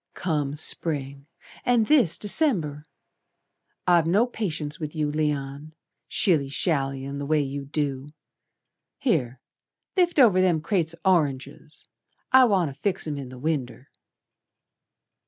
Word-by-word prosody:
"Come 150 Hz, -5 st, -2 dB
Spring, 140 Hz, -3 st, 0 dB, 0.4 s
and 240 Hz, -3 st, +3 dB
this 240 Hz, -, +3 dB
December! 190 Hz, -, +1 dB, 1.0 s
I've 175 Hz, -3 st, +4 dB
no 200 Hz, +8 st, +3 dB
patience 160 Hz, -10 st, -4 dB
with 155 Hz, 0 st, -6 dB
you, 150 Hz, -1 st, -1 dB
Leon, 150 Hz, 0 st, -3 dB, 0.3 s
Shilly 160 Hz, -8 st, +1 dB
shallyin' 135 Hz, -2 st, -2 dB
the 145 Hz, -, -4 dB
way 155 Hz, 0 st, +2 dB
you 140 Hz, 0 st, -5 dB
do. 140 Hz, -1 st, -3 dB, 0.9 s
Here, 135 Hz, -, -1 dB, 0.6 s
lift 355 Hz, -3 st, +2 dB
over 215 Hz, -9 st, +6 dB
them 180 Hz, -4 st, +2 dB
crates 170 Hz, -1 st, -1 dB
o' 190 Hz, -, +6 dB
oranges 140 Hz, 0 st, -5 dB, 0.4 s
I 260 Hz, 0 st, +7 dB
wanter 185 Hz, -, +1 dB
fix 180 Hz, +8 st, -2 dB
'em 150 Hz, -2 st, -4 dB
in 135 Hz, -2 st, -7 dB
the 130 Hz, -, -11 dB
winder." 135 Hz, -2 st, -4 dB
155 Hz, 120 wpm, -25 LUFS, 140-185 Hz, 1.0 s, I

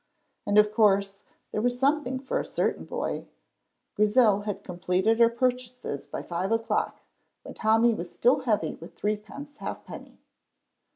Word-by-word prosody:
And 205 Hz, -, +2 dB
of 210 Hz, 0 st, +5 dB
course 200 Hz, -2 st, +3 dB, 0.3 s
there 215 Hz, -, -1 dB
was 245 Hz, +1 st, 0 dB
something 275 Hz, -1 st, +1 dB
for 260 Hz, 0 st, -2 dB
a -, -, -2 dB
certain -, -, -1 dB
boy. -, -, -4 dB, 0.7 s
Grizel 210 Hz, -1 st, +4 dB
had 205 Hz, -2 st, -4 dB
completed 185 Hz, +5 st, 0 dB
her 230 Hz, -1 st, +7 dB
purchases 250 Hz, -, -2 dB
by -, -, -5 dB
five 180 Hz, +4 st, -3 dB
o'clock, 225 Hz, 0 st, 0 dB, 0.4 s
when -, -, -9 dB
Tommy 225 Hz, +2 st, +3 dB
was 175 Hz, -5 st, -6 dB
still 255 Hz, +4 st, +3 dB
heavy 215 Hz, -, 0 dB
with 165 Hz, -, -12 dB
threepence 215 Hz, +8 st, -4 dB
halfpenny. -, -, -8 dB
220 Hz, 140 wpm, -27 LUFS, 200-250 Hz, 0.7 s, her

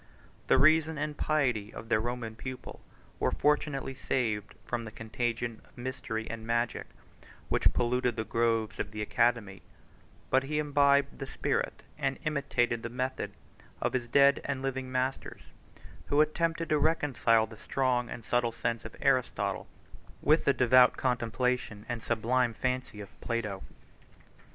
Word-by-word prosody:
The -, -, +5 dB
reason 160 Hz, +1 st, +4 dB
and 150 Hz, +1 st, -2 dB
piety 125 Hz, -10 st, 0 dB
of 115 Hz, -, -9 dB
their 110 Hz, -, +3 dB
Roman 115 Hz, -1 st, -4 dB
pupil 130 Hz, +2 st, -8 dB, 0.4 s
were -, -, +2 dB
fortunately 145 Hz, -2 st, 0 dB
saved 110 Hz, -6 st, -2 dB
from 120 Hz, -1 st, -2 dB
the 110 Hz, -, -7 dB
contagion 115 Hz, +1 st, -3 dB
of -, -, -25 dB
mystery 120 Hz, -3 st, -4 dB
and 115 Hz, -1 st, -6 dB
magic, 115 Hz, +1 st, -1 dB, 0.6 s
which -, -, +3 dB
polluted 125 Hz, 0 st, +1 dB
the 110 Hz, -, -2 dB
groves 115 Hz, -1 st, 0 dB
of 105 Hz, -, -2 dB
the 105 Hz, 0 st, -4 dB
academy; 115 Hz, -4 st, +1 dB, 0.7 s
but 130 Hz, -, +5 dB
he 150 Hz, +3 st, -3 dB
imbibed 140 Hz, -1 st, +3 dB
the 135 Hz, -, -5 dB
spirit, -, -, -2 dB, 0.2 s
and 135 Hz, -2 st, 0 dB
imitated 135 Hz, -6 st, 0 dB
the 115 Hz, -, -4 dB
method, 130 Hz, +2 st, -3 dB, 0.5 s
of -, -, -1 dB
his 125 Hz, -2 st, -1 dB
dead 140 Hz, +3 st, +5 dB
and 135 Hz, -1 st, -3 dB
living 130 Hz, -1 st, -3 dB
masters, 130 Hz, +1 st, -3 dB, 0.5 s
who 145 Hz, -, +2 dB
attempted 165 Hz, +2 st, +1 dB
to 150 Hz, -, +3 dB
reconcile 130 Hz, -8 st, +3 dB
the 110 Hz, 0 st, -12 dB
strong 125 Hz, 0 st, 0 dB
and 115 Hz, -, -7 dB
subtile 120 Hz, -1 st, +1 dB
sense 115 Hz, 0 st, -2 dB
of -, -, -9 dB
Aristotle -, -, +1 dB, 0.5 s
with 155 Hz, +3 st, +3 dB
the 140 Hz, -, +5 dB
devout 125 Hz, 0 st, +6 dB
contemplation 125 Hz, -3 st, -1 dB
and 120 Hz, -1 st, -3 dB
sublime 120 Hz, +1 st, +1 dB
fancy 130 Hz, -4 st, -2 dB
of 100 Hz, -, -13 dB
Plato. 105 Hz, -5 st, -2 dB
125 Hz, 145 wpm, -30 LUFS, 115-135 Hz, 0.7 s, devout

